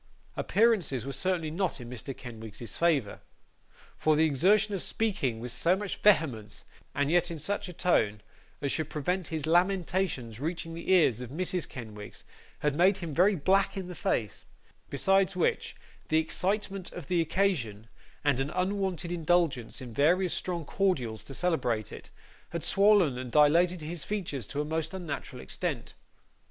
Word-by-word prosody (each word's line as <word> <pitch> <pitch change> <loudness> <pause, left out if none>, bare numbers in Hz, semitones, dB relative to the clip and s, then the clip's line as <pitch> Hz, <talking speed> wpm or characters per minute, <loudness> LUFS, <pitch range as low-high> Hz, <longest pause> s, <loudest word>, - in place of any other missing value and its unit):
Appearances 195 - +2
were 140 - -4
certainly 175 -3 -1
not 180 -2 -1
in 120 - -8
Mr. 125 +2 -6
Kenwigs's 110 -3 -9
favour, 150 -11 +1 0.7
for 155 -1 +2
the 160 +1 +4
exertion 195 +8 +3
of 190 - -2
speaking 145 - -1
with 120 +1 -5
so 165 +9 +2
much 200 0 -4
vehemence, 135 - +2 0.3
and 145 +1 +1
yet 175 +1 +3
in 165 - -5
such 200 +5 -2
a - - -7
tone 105 -12 +1 0.4
as 140 - +1
should 160 -2 -1
prevent 175 +5 -2
his 155 -2 -3
lamentations 175 - +1
reaching 165 +2 -3
the 170 +3 -3
ears 155 - +4
of 125 - -6
Mrs. 180 +4 -1
Kenwigs, 105 -4 -9 0.4
had 150 -1 +1
made 185 +6 +4
him 170 -5 -5
very 190 +6 +4
black 195 +5 +2
in 185 -2 -5
the - - -5
face; 110 - -2 0.4
besides 195 +6 +2
which, 180 - 0 0.3
the 155 - +2
excitement 190 +4 -1
of 175 - -7
the 175 +1 +1
occasion, 160 - 0 0.4
and 145 -3 +2
an 135 +2 -1
unwonted 185 -3 -1
indulgence 165 -9 0
in 125 -3 -8
various 175 +8 +3
strong 175 -3 -2
cordials 130 - 0
to 135 - -9
celebrate 125 - 0
it, - - -10 0.4
had 170 -2 -4
swollen 195 -10 +4
and 125 -1 -6
dilated 170 +5 +4
his 160 +2 -5
features 175 - -3
to 145 - -2
a - - -3
most 160 +3 -2
unusual 165 -7 -5
extent. 65 - -4
165 Hz, 160 wpm, -29 LUFS, 135-185 Hz, 0.7 s, the